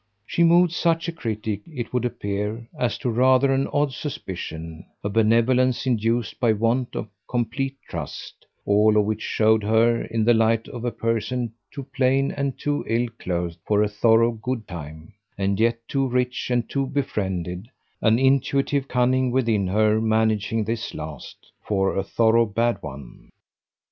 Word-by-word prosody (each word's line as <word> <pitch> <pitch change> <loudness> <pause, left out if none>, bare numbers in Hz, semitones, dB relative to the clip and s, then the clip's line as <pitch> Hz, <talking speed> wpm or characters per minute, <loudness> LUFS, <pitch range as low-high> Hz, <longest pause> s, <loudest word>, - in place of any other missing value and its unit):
She 170 - -1
moved 170 +1 +5
such 165 0 +1
a - - -1
critic, 110 -9 -4
it 125 -6 -6
would 125 0 0
appear, 105 0 -3
as 120 - -1
to 125 - -2
rather 130 +3 +4
an 135 +1 +1
odd 145 -2 0
suspicion, 80 - -6 0.2
a 100 - -1
benevolence 115 +4 +2
induced 115 -2 0
by 120 - +2
a 110 - +4
want 115 +3 0
of - - -3 0.2
complete 125 +3 -2
trust: - - -7 0.2
all 105 +1 +4
of 105 - +4
which 110 0 -2
showed 110 0 +2
her 115 +2 +2
in 115 -1 -1
the 120 - +5
light 115 0 +2
of 120 -1 -7
a 120 - 0
person 115 +1 -2 0.2
too 140 - -7
plain 135 +1 +2
and 140 -2 -3
too 145 0 -1
ill 120 +1 0
clothed 85 -1 -3
for 105 0 +2
a - - +2
thorough 115 +2 +3
good 115 0 -4
time, 80 +2 -9 0.2
and 100 0 0
yet 115 +1 +3
too 135 -1 0
rich 125 0 -1
and 120 -2 0
too 135 -1 -1
befriended 100 -8 -3 0.3
an 110 0 +4
intuitive 135 +1 +2
cunning 130 0 +2
within 115 -6 +1
her 110 +3 +2
managing 110 0 +1
this 115 +1 -4
last 75 -3 -9
for 95 -2 0
a 95 - +1
thorough 115 +3 +3
bad 115 +3 0
one. 70 -2 -10
115 Hz, 165 wpm, -23 LUFS, 105-130 Hz, 0.3 s, moved